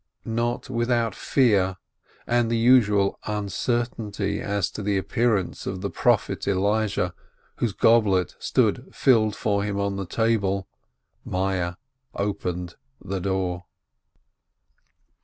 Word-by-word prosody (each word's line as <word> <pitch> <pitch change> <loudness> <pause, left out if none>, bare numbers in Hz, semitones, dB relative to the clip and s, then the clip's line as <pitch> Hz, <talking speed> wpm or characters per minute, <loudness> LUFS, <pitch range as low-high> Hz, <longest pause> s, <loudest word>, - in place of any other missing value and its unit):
Not 115 +1 -1
without 120 -3 0
fear, 100 -9 +2 0.5
and 120 -1 +1
the 115 - +1
usual 110 -5 +4
uncertainty 105 0 -2
as 100 -2 -1
to - - -6
the 100 -1 0
appearance 105 -1 0
of 95 -1 -4
the 100 - -3
Prophet 120 -4 +1
Elijah, 100 -2 +1 0.4
whose 115 -5 -1
goblet 100 -7 +3
stood - - +1
filled 110 -5 +3
for 100 -1 0
him 100 -1 -2
on 100 0 -1
the 95 -2 -4
table, 100 -2 0 0.6
Meyerl 90 -2 -1 0.4
opened 90 -3 -3 0.2
the 95 +1 -4
door. 90 -2 -2
100 Hz, 110 wpm, -25 LUFS, 95-115 Hz, 0.6 s, usual